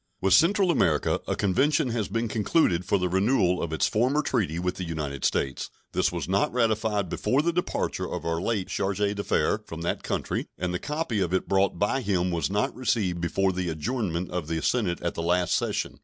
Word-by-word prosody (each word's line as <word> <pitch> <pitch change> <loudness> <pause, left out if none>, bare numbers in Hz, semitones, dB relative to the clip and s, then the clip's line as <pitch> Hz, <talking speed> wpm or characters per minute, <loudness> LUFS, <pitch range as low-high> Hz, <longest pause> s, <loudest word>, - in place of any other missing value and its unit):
With 95 -1 +2
Central 185 - +5
America 80 - +2
a - - 0
convention 135 - +2
has 115 -3 -1
been 115 +3 -1
concluded 105 - +1
for 100 - +2
the 90 -1 0
renewal 95 -1 +2
of 85 - -3
its 80 - +1
former 130 +7 +1
treaty 105 - 0
with 90 +1 -2
the 95 - -3
United 75 -5 -4
States. 65 -1 0 0.2
This - - +1
was - - -4
not 95 +2 +1
ratified 110 -4 +1
before 135 - 0
the 170 +1 +1
departure 180 +1 -2
of - - -4
our 85 0 -1
late 105 -3 -1
charge 100 -1 -1
d'affaires 100 0 +1
from 80 0 -7
that 85 - -2
country, - - -2
and 90 0 -2
the 90 - -1
copy 150 -7 -2
of 90 -1 0
it 95 - -1
brought 95 0 +2
by 105 +7 +1
him 90 -5 0
was 85 -1 -1
not 105 +2 0
received 105 -8 0
before 95 +3 +1
the 90 -1 -2
adjournment 90 - -2
of 90 -4 -3
the 80 0 -1
Senate 100 -9 +1
at 85 - -1
the - - -4
last 90 +1 +1
session. - - -1
95 Hz, 205 wpm, -26 LUFS, 85-115 Hz, 0.2 s, Central